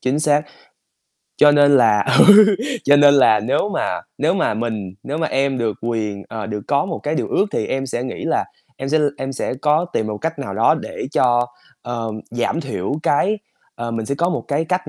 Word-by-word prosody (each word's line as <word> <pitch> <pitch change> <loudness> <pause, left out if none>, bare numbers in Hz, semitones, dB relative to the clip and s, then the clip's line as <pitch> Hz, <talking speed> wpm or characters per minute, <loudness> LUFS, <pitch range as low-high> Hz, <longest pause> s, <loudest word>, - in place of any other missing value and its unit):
Chính 130 +3 0
xác. 150 -1 +2 0.9
Cho 150 - +6
nên 145 -1 +5
là 110 -4 +4 0.2
ừ, 205 +1 +8 0.5
cho 145 +1 +5
nên 145 0 +6
là 110 -6 +5
nếu 125 - 0
mà - - -2 0.2
nếu 160 +4 +1
mà 190 - 0
mình 110 -4 -4
nếu 145 +3 -4
mà 160 - 0
em 135 -1 0
được 110 -5 -2
quyền, 110 -4 -3
ờ, 110 -3 -6
được 105 -1 -4
có 140 0 +2
một 165 - -4
cái 150 +1 -2
điều - - -2
ước 200 - +1
thì 110 - -2
em 135 0 -3
sẽ 120 -1 -3
nghĩ 130 - -6
là - - 0 0.3
em 135 - -5
sẽ 155 +3 +2
l 150 - +2
em 135 0 -4
sẽ 130 - -3
có 150 +4 +1
tìm 110 - -1
một 105 -1 -4
cách 165 -1 -4
nào 125 -9 -5
đó 115 +8 +3
để 155 - -6
cho, 120 -2 +2 0.4
ờ, 115 -2 -4 0.2
giảm 120 +7 -1
thiểu 120 - -4
cái 200 +10 +1 0.4
ờ, 120 0 -5
mình 115 -1 -4
sẽ 140 - -2
có 170 +5 0
một - - -3
cái 145 +3 0
cách 180 +2 -2
135 Hz, 220 wpm, -19 LUFS, 115-150 Hz, 0.9 s, ừ